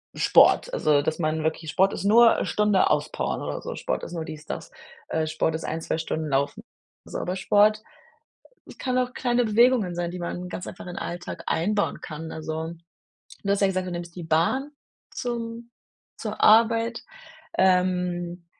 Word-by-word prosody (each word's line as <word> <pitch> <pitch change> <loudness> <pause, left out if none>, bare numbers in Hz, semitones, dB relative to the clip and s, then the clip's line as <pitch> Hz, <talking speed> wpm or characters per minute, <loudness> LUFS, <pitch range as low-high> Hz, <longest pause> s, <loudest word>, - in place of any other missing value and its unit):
Sport. - - +5
Also, 150 - +3
dass 155 +3 -2
man 155 -1 0
wirklich 160 0 -2
Sport 195 +1 +3
ist - - -4
nur 230 +2 +6
'ne - - -1
Stunde 210 -2 +2
auspowern 150 0 -1
oder - - -4
so. - - -6
Sport - - -3
ist - - -7
nur 165 -2 -3
dies 155 -1 -9
das, - - -6 0.4
äh, 160 -1 0
Sport 155 +1 0
ist 160 - -5
ein, 160 +1 -3
2 - - -2
Stunden 160 -1 -3
laufen. 140 +1 -1 0.4
So - - -6
aber 180 +1 -3
Sport 210 +2 +3 1.0
kann 255 -1 -1
auch 250 0 0
kleine 245 -1 +1
Bewegungen 220 -4 +3
sein, 175 0 -2
die 180 - -6
man 180 +1 -5
ganz 180 - -6
einfach 180 - -9
in 175 - -7
Alltag 175 0 -6
einbauen 205 +5 0
kann. 160 +1 -7
Also, 160 +1 -4 0.7
du 200 - 0
hast 200 0 +1
ja 195 - +5
gesagt, 185 -1 -1
du - - -4
nimmst 175 -1 -6
die 175 - -6
Bahn 170 - +1 0.4
zum 235 -1 -5 0.5
zur - - -5
Arbeit, 230 +1 +4 0.6
ähm, 180 -2 +1
180 Hz, 175 wpm, -25 LUFS, 160-215 Hz, 1.0 s, nur